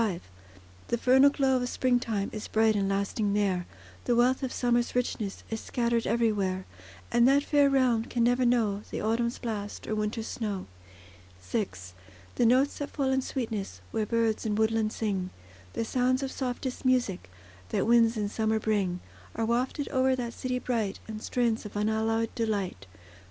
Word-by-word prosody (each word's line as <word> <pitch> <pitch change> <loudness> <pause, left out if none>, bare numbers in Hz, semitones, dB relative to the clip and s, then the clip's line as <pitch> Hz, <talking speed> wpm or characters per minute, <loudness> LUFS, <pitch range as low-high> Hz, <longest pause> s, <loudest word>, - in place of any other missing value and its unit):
V 195 -7 0 0.7
The 235 - 0
vernal 265 +4 +6
glow 270 -2 +2
of 245 0 -2
springtime 240 -6 0
Is 215 -1 -5
bright 220 0 +3
and 195 -1 +1
lasting 200 +1 0
there, 190 -4 0 0.4
The 240 - +2
wealth 250 +3 +3
of 260 -2 -2
summer's 240 -1 +1
richness 225 -5 -2
Is 225 - -3
scattered 235 -1 0
everywhere; 205 -5 +1 0.5
And 240 +1 +5
that 280 +1 +4
fair 290 -1 +4
realm 250 -4 +2
can 235 -1 0
never 245 +2 +3
know 225 -5 +2
The - - -4
autumn's 235 +2 0
blast 210 -4 -5
or - - -2
winter's 215 +1 -2
snow. 205 -6 -3 0.7
VI 90 0 -1 0.7
The 235 - +3
notes 260 +4 +3
that 285 - -3
fall 270 -2 -1
in 265 0 +2
sweetness, 220 - -4
Where 215 -1 -1
birds 230 -1 +1
in 215 -2 -1
woodland 220 0 +1
sing; 195 -5 -2 0.4
The 230 - -2
sounds 255 +3 +1
of 265 - -3
softest 255 0 -4
music, 245 - +1 0.4
That - - 0
winds 230 0 +4
in 210 -1 0
summer 220 +1 0
bring, 200 -5 0 0.3
Are 225 - 0
wafted 250 +5 0
o'er 260 0 +3
that 240 -2 -4
city 255 +1 -2
bright, 230 -6 -2
In 220 -1 -6
strains 235 0 0
of 210 - -9
unalloyed 220 +2 0
delight. 200 - -2
230 Hz, 165 wpm, -28 LUFS, 210-250 Hz, 0.7 s, vernal